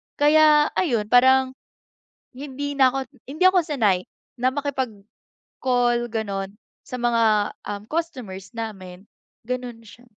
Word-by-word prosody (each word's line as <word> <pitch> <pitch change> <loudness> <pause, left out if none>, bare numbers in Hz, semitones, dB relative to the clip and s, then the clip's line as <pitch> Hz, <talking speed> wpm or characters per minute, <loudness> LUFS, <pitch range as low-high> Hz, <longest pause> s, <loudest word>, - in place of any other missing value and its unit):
kaya 300 0 +5
ayun, 240 - +1
parang, 260 +1 +5 0.8
hindi 285 +2 -6
na 270 -2 +4
ako, 270 +2 -2 0.3
hindi 310 +6 -2
ako 370 -1 +6
sanay 215 - 0 0.3
na 255 - +3
makipag-call 260 -7 -5 0.9
ganon, 200 -1 -4 0.2
sa 250 - -7
mga, 225 -3 +2
um, 205 0 -5
customers 245 - -5
namin, 195 -4 -8 0.4
ganon 250 -2 -4
siya. 225 +2 -16
250 Hz, 110 wpm, -23 LUFS, 210-285 Hz, 0.9 s, ako